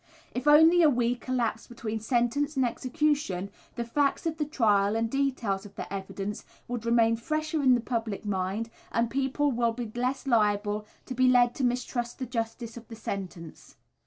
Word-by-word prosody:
If 250 +3 -3
only 320 +4 +7
a 315 - +7
week 245 -1 0
elapsed 235 -3 -1
between 225 -2 -4
sentence 245 +6 0
and 260 - +3
execution, 255 - -1 0.2
the 235 - -2
facts 280 +6 0
of 320 -1 -1
the 300 - +1
trial 210 -7 +2
and 225 0 0
details 255 -8 0
of 205 -1 -13
the - - -6
evidence 195 +1 -5 0.2
would 235 -1 -4
remain 230 -1 +4
fresher 310 +5 -1
in 260 -2 +5
the 240 - 0
public 225 -3 -3
mind, 200 +3 -2 0.2
and 230 0 +1
people 275 +2 +1
would 235 -2 +1
be 235 -3 -5
less 255 +3 -1
liable 210 -3 +1 0.2
to 255 - -5
be 255 +1 +4
led 245 -1 +5
to 270 - -4
mistrust 240 -1 -1
the 260 - -3
justice 230 -1 -4
of 235 - -11
the 225 - -9
sentence. 185 -6 -7
235 Hz, 180 wpm, -28 LUFS, 220-265 Hz, 0.2 s, only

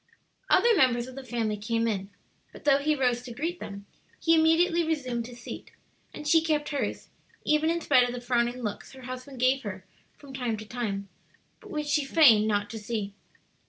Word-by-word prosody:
Other 470 -1 +5
members 245 -7 +3
of 260 - -10
the 270 +1 -8
family 225 -4 -2
came 230 +2 -1
in, 200 -3 -2 0.4
but - - -13
though 280 -1 +4
he 300 +2 +1
rose 250 -3 +1
to 245 -1 -8
greet 335 +6 -3
them, 200 0 -8 0.3
he 330 - +3
immediately 330 +2 +4
resumed 255 -8 -2
his 245 -1 -11
seat, - - -8 0.4
and 300 - -8
she 325 +2 +5
kept 305 -2 0
hers, 285 - -3 0.4
even 305 +1 +3
in 340 0 0
spite 255 -5 +4
of - - -3
the - - -4
frowning 240 0 0
looks 210 +3 -5
her 260 -1 -12
husband 255 +1 -8
gave 260 +2 +3
her 190 -4 -7 0.3
from 280 -2 -13
time 245 -4 -2
to 215 - -8
time, 210 -4 -4 0.5
but 420 - -14
which 300 -6 -3
she 295 0 +1
feigned 255 -8 +6
not 205 -1 0
to 225 - -6
see. 210 -2 -4
255 Hz, 195 wpm, -27 LUFS, 230-300 Hz, 0.5 s, feigned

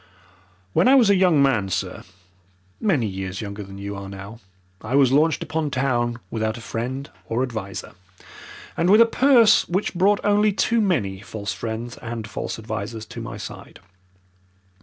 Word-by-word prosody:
"When - - +4
I 265 - +7
was 235 -7 +6
a - - +5
young 180 -6 +4
man, 110 -8 +1
sir, - - -3 0.8
many 165 - +1
years 95 -1 -4
younger 100 -1 -6
than 95 -1 -9
you 100 +1 -5
are 100 0 -7
now, 100 +3 -9 0.4
I 115 +5 -2
was 135 -3 +5
launched 155 +4 +3
upon 160 -1 -2
town 120 -3 0
without 110 0 -2
a - - -9
friend 130 +4 -4 0.2
or 115 +3 0
adviser, 110 -6 -5 0.8
and 170 +2 +1
with 210 +3 +7
a - - +8
purse 235 -2 +5
which 190 +4 -1
brought 195 +3 +3
only 205 0 +3
too 230 +3 +2
many 110 - 0
false 105 0 -5
friends 115 +2 -5
and 115 -2 -6
false - - -5
advisers 110 0 -5
to - - -8
my - - -6
side. - - -9
120 Hz, 165 wpm, -23 LUFS, 105-180 Hz, 0.8 s, a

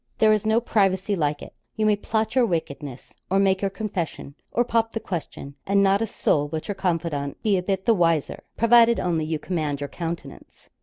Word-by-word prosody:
There 215 0 +5
is 215 0 0
no 220 +1 +4
privacy 200 -3 +1
like 150 -4 -1
it; - - -11 0.2
you 220 - 0
may 210 -1 +4
plot 220 +2 -2
your 250 -2 +3
wickedness, 145 - -5 0.2
or 190 - +2
make 195 -1 +2
your 200 - +1
confession, 190 -8 -5 0.2
or 240 - +2
pop 230 -1 0
the 225 - -2
question, 165 -7 -6
and 200 0 +3
not 195 +1 +3
a 225 - 0
soul 145 -7 0
but 155 +1 -5
your 205 - -1
confidant 165 -7 -2
be 210 -3 +3
a 185 - +1
bit 190 +1 -2
the 230 - +5
wiser 165 -6 0
provided 235 0 +5
only 165 -3 0
you 160 0 -2
command 150 -4 -3
your 145 0 -4
countenance. 170 -1 -7
190 Hz, 205 wpm, -24 LUFS, 160-215 Hz, 0.2 s, There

